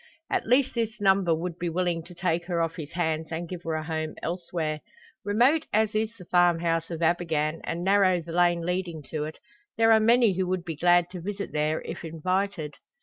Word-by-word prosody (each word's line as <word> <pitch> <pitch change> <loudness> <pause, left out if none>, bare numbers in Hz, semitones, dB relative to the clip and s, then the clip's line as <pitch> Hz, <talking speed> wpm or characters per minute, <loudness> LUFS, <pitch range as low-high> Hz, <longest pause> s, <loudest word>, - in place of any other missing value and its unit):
At - - 0
least 255 +3 +3
this 230 -1 -2
number 190 -4 +3
would 170 +1 -5
be 175 - -1
willing 175 0 0
to 175 0 -13
take 175 -1 -1
her 175 -1 -1
off 165 +1 -1
his 155 -3 -7
hands 160 -2 -1
and 170 +1 -4
give 180 0 -7
her 165 -2 -3
a 155 - -2
home 155 -1 -3
elsewhere. 170 -3 -3 0.4
Remote 245 +10 +3
as 215 0 +2
is 220 +1 -1
the 180 - -12
farm 175 -1 +4
house 165 -1 0
of 170 -1 -4
Abergann, 160 -2 0
and 170 +1 -3
narrow 190 -2 +4
the 165 0 -8
lane 175 0 +2
leading 175 -3 -2
to 150 -1 -2
it, 155 - -7 0.4
there 225 0 +5
are 220 - +7
many 230 -1 +4
who 185 0 -1
would 180 -1 -2
be 165 - -4
glad 175 +2 +3
to 180 -2 -7
visit 200 +2 -5
there, 155 +1 0
if - - -7
invited. 165 0 -2
175 Hz, 210 wpm, -27 LUFS, 165-195 Hz, 0.4 s, are